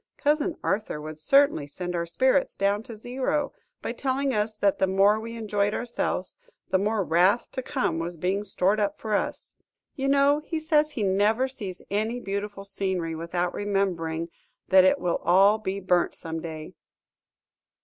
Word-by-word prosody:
Cousin 305 Hz, +3 st, +1 dB
Arthur 195 Hz, -7 st, -1 dB
would 155 Hz, +1 st, -8 dB
certainly 275 Hz, -, +3 dB
send 180 Hz, +5 st, -5 dB
our 170 Hz, 0 st, -2 dB
spirits 260 Hz, +9 st, +2 dB
down 200 Hz, +1 st, +1 dB
to 225 Hz, -1 st, -10 dB
zero, 260 Hz, +5 st, -2 dB, 0.3 s
by -, -, -2 dB
telling 270 Hz, +2 st, -1 dB
us 210 Hz, 0 st, -1 dB
that 200 Hz, -2 st, +1 dB
the 190 Hz, -, +3 dB
more 195 Hz, +3 st, +4 dB
we 230 Hz, +1 st, -7 dB
enjoyed 210 Hz, -2 st, 0 dB
ourselves 240 Hz, 0 st, -2 dB, 0.3 s
the 190 Hz, -, +3 dB
more 210 Hz, +1 st, 0 dB
wrath 180 Hz, +7 st, +2 dB
to 260 Hz, -, -3 dB
come 255 Hz, -, -1 dB
was 170 Hz, +1 st, -4 dB
being 190 Hz, +5 st, -1 dB
stored 195 Hz, +1 st, +1 dB
up 205 Hz, -1 st, 0 dB
for 215 Hz, -1 st, -4 dB
us! 205 Hz, -, -2 dB, 0.4 s
You 270 Hz, -2 st, -2 dB
know 280 Hz, +1 st, +4 dB
he 315 Hz, +1 st, -4 dB
says 305 Hz, -1 st, +2 dB
he 225 Hz, -, -2 dB
never 205 Hz, +6 st, +2 dB
sees 205 Hz, -9 st, -7 dB
any 220 Hz, +4 st, -1 dB
beautiful 200 Hz, -1 st, -5 dB
scenery 190 Hz, -4 st, -2 dB
without 175 Hz, +2 st, -2 dB
remembering 175 Hz, -5 st, -1 dB, 0.4 s
that 190 Hz, -1 st, +7 dB
it 185 Hz, -, +4 dB
will 175 Hz, -1 st, 0 dB
all 195 Hz, +5 st, +5 dB
be 195 Hz, -2 st, -3 dB
burnt 180 Hz, -2 st, +1 dB
some 165 Hz, -1 st, -5 dB
day!" 160 Hz, -1 st, -7 dB
200 Hz, 170 wpm, -26 LUFS, 180-240 Hz, 0.4 s, that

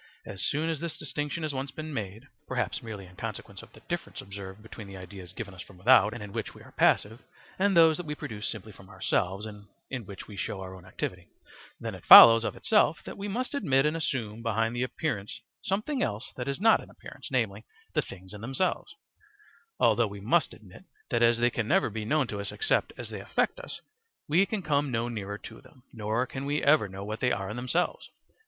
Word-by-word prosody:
As 95 Hz, -2 st, -5 dB
soon 150 Hz, +3 st, 0 dB
as 160 Hz, -, -3 dB
this 170 Hz, -1 st, -4 dB
distinction 150 Hz, +2 st, -3 dB
has 155 Hz, -2 st, -1 dB
once 135 Hz, +1 st, -3 dB
been 155 Hz, +3 st, -7 dB
made 110 Hz, +2 st, -5 dB, 0.2 s
(perhaps 125 Hz, 0 st, -2 dB
merely 105 Hz, -5 st, -7 dB
in 90 Hz, 0 st, -16 dB
consequence -, -, -6 dB
of -, -, -15 dB
the -, -, -16 dB
difference -, -, -5 dB
observed 100 Hz, +1 st, -8 dB
between 110 Hz, -1 st, -10 dB
the 95 Hz, -1 st, -9 dB
ideas 95 Hz, 0 st, -10 dB
given 100 Hz, 0 st, -7 dB
us 90 Hz, -, -9 dB
from 95 Hz, -, -13 dB
without, 110 Hz, +1 st, +6 dB
and 115 Hz, -1 st, -6 dB
in 100 Hz, -1 st, -9 dB
which -, -, -4 dB
we -, -, -13 dB
are -, -, -15 dB
passive, 110 Hz, +3 st, +2 dB, 0.4 s
and 195 Hz, -2 st, +3 dB
those 160 Hz, -2 st, +7 dB
that 180 Hz, -, -5 dB
we 150 Hz, -, -3 dB
produce 115 Hz, -8 st, -5 dB
simply 110 Hz, 0 st, -6 dB
from 95 Hz, -1 st, -16 dB
ourselves, 95 Hz, +1 st, -1 dB
and 105 Hz, -1 st, -10 dB, 0.2 s
in 125 Hz, -7 st, -4 dB
which 100 Hz, -, -9 dB
we 105 Hz, -, -10 dB
show 100 Hz, -, -3 dB
our 95 Hz, -1 st, -7 dB
own 90 Hz, -1 st, -12 dB
activity), 90 Hz, -1 st, -5 dB, 0.5 s
then -, -, -4 dB
it -, -, -10 dB
follows 115 Hz, 0 st, +11 dB
of -, -, -2 dB
itself 210 Hz, -7 st, +2 dB
that -, -, -7 dB
we 200 Hz, -, -5 dB
must 245 Hz, +7 st, -2 dB
admit 140 Hz, -, +2 dB
and 150 Hz, +1 st, +1 dB
assume 115 Hz, -9 st, -2 dB
behind 115 Hz, 0 st, 0 dB
the 120 Hz, -, -1 dB
appearance 125 Hz, -5 st, -3 dB, 0.2 s
something 215 Hz, +9 st, -1 dB
else 110 Hz, 0 st, -2 dB
that 125 Hz, -, -5 dB
is 140 Hz, +2 st, -2 dB
not 225 Hz, +2 st, +5 dB
an -, -, -13 dB
appearance, -, -, -11 dB
namely, -, -, -1 dB, 0.3 s
the -, -, +3 dB
things 95 Hz, +1 st, -11 dB
in 105 Hz, -, -9 dB
themselves; 180 Hz, -, -1 dB, 0.8 s
although 120 Hz, -2 st, +4 dB
we 100 Hz, 0 st, -8 dB
must 135 Hz, +10 st, +2 dB
admit 100 Hz, -, -15 dB, 0.3 s
that 120 Hz, -2 st, +2 dB
as 120 Hz, 0 st, +5 dB
they 120 Hz, +1 st, +3 dB
can 115 Hz, -2 st, -2 dB
never 115 Hz, -, +3 dB
be 110 Hz, 0 st, -4 dB
known 150 Hz, +4 st, +2 dB
to 105 Hz, -3 st, -5 dB
us 100 Hz, -, -4 dB
except 435 Hz, -, +1 dB
as -, -, -7 dB
they -, -, -5 dB
affect -, -, 0 dB
us, -, -, -8 dB, 0.5 s
we 175 Hz, +6 st, +4 dB
can 210 Hz, -4 st, -3 dB
come 145 Hz, -2 st, +1 dB
no 115 Hz, -1 st, -1 dB
nearer 100 Hz, -4 st, -4 dB
to -, -, -11 dB
them, 130 Hz, -, -20 dB
nor 110 Hz, +2 st, -1 dB
can 135 Hz, +1 st, -6 dB
we 145 Hz, +1 st, 0 dB
ever 140 Hz, -8 st, +4 dB
know 95 Hz, +1 st, -7 dB
what 110 Hz, +2 st, -4 dB
they 125 Hz, -, +2 dB
are 100 Hz, 0 st, -2 dB
in -, -, -5 dB
themselves. 125 Hz, +9 st, -1 dB
115 Hz, 225 wpm, -29 LUFS, 100-150 Hz, 0.8 s, follows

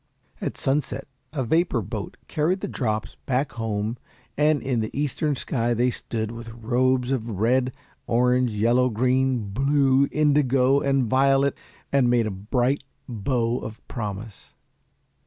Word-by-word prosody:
At -, -, -3 dB
sunset 135 Hz, +1 st, -1 dB, 0.2 s
a 140 Hz, -4 st, -2 dB
vapor 135 Hz, -3 st, +1 dB
boat 105 Hz, +1 st, -6 dB
carried 175 Hz, +5 st, 0 dB
the -, -, -2 dB
drops 110 Hz, -4 st, -2 dB
back 135 Hz, +1 st, 0 dB
home 110 Hz, -1 st, -3 dB, 0.4 s
and 150 Hz, 0 st, +3 dB
in 130 Hz, -3 st, 0 dB
the 110 Hz, -, -1 dB
eastern 150 Hz, +1 st, 0 dB
sky 120 Hz, -2 st, -1 dB
they 125 Hz, +2 st, +2 dB
stood 110 Hz, -2 st, -4 dB
with 115 Hz, 0 st, -8 dB
robes 125 Hz, +3 st, +1 dB
of 120 Hz, -3 st, -1 dB
red, 125 Hz, +3 st, +2 dB, 0.4 s
orange, 125 Hz, +1 st, +3 dB
yellow, 120 Hz, +4 st, +2 dB
green, 125 Hz, -1 st, +1 dB
blue, 135 Hz, +3 st, +3 dB
indigo, 140 Hz, -3 st, +3 dB
and 135 Hz, -1 st, +2 dB
violet, 135 Hz, +3 st, +3 dB, 0.4 s
and 135 Hz, -3 st, +3 dB
made 120 Hz, -2 st, +3 dB
a 110 Hz, -, -2 dB
bright 120 Hz, +8 st, 0 dB, 0.2 s
bow 120 Hz, +1 st, -1 dB
of 110 Hz, 0 st, -9 dB
promise. 105 Hz, -2 st, -6 dB
125 Hz, 140 wpm, -24 LUFS, 115-135 Hz, 0.4 s, and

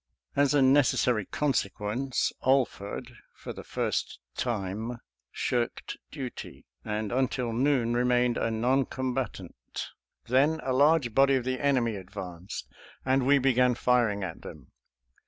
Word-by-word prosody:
As 140 Hz, +1 st, +3 dB
a 140 Hz, -, +5 dB
necessary 125 Hz, -5 st, +3 dB
consequence, 125 Hz, -2 st, -1 dB
Alford 125 Hz, -2 st, 0 dB, 0.2 s
for -, -, -7 dB
the -, -, -9 dB
first -, -, -2 dB, 0.2 s
time 110 Hz, +1 st, -3 dB, 0.3 s
shirked 120 Hz, -1 st, -2 dB
duty, 130 Hz, -3 st, -7 dB, 0.2 s
and 105 Hz, 0 st, -3 dB
until 125 Hz, -2 st, 0 dB
noon 125 Hz, -1 st, +2 dB
remained 125 Hz, 0 st, +2 dB
a -, -, 0 dB
non 125 Hz, +4 st, +1 dB
combatant. 125 Hz, -, -4 dB, 0.3 s
Then 140 Hz, +6 st, +3 dB
a 130 Hz, 0 st, 0 dB
large 140 Hz, -3 st, +4 dB
body 135 Hz, +1 st, +5 dB
of 130 Hz, -, 0 dB
the 130 Hz, 0 st, -2 dB
enemy 125 Hz, -6 st, +1 dB
advanced, 95 Hz, -2 st, -7 dB, 0.4 s
and 130 Hz, 0 st, +2 dB
we 140 Hz, +1 st, +6 dB
began 125 Hz, -2 st, +3 dB
firing 115 Hz, -5 st, +2 dB
at 85 Hz, -4 st, -6 dB
them. -, -, -11 dB
125 Hz, 125 wpm, -28 LUFS, 110-135 Hz, 0.4 s, we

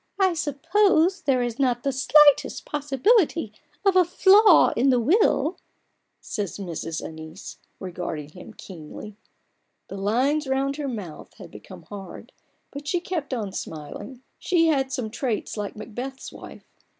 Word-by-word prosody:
" -, -, -31 dB
I -, -, -2 dB
suppose 345 Hz, +4 st, +2 dB
there 260 Hz, -6 st, +1 dB
is 240 Hz, +1 st, -4 dB
not 245 Hz, -3 st, +1 dB
the 275 Hz, -, 0 dB
slightest 290 Hz, +2 st, +4 dB
possibility 295 Hz, -, +1 dB, 0.3 s
of 390 Hz, -1 st, +4 dB
a 370 Hz, -, +7 dB
flaw 380 Hz, +2 st, +5 dB
in 260 Hz, +4 st, +3 dB
the 250 Hz, -2 st, +4 dB
will? 315 Hz, -, +2 dB, 0.3 s
" -, -, -48 dB, 0.2 s
says 205 Hz, -5 st, -5 dB
Mrs. 165 Hz, -4 st, -5 dB
Ann 160 Hz, 0 st, -10 dB
ice, 185 Hz, +5 st, -11 dB, 0.2 s
regarding 170 Hz, -5 st, -5 dB
him 180 Hz, +6 st, -12 dB
keenly. 185 Hz, +4 st, -10 dB, 0.7 s
The 195 Hz, -, -7 dB
lines 260 Hz, +9 st, 0 dB
round 270 Hz, +1 st, -1 dB
her 295 Hz, -2 st, -3 dB
mouth 200 Hz, -10 st, -8 dB
had -, -, -12 dB
become -, -, -12 dB
hard, 200 Hz, -2 st, -10 dB, 0.4 s
but 285 Hz, +1 st, -8 dB
she 355 Hz, +4 st, 0 dB
kept 340 Hz, -5 st, -4 dB
on 220 Hz, -6 st, -3 dB
smiling: 185 Hz, -, -8 dB, 0.2 s
she 345 Hz, -3 st, +2 dB
had 270 Hz, -3 st, +1 dB
some 245 Hz, -5 st, -3 dB
traits 240 Hz, -2 st, -3 dB
like 205 Hz, -2 st, -5 dB
Macbeth's 245 Hz, +5 st, -7 dB
wife. -, -, -12 dB
265 Hz, 150 wpm, -24 LUFS, 210-310 Hz, 0.7 s, a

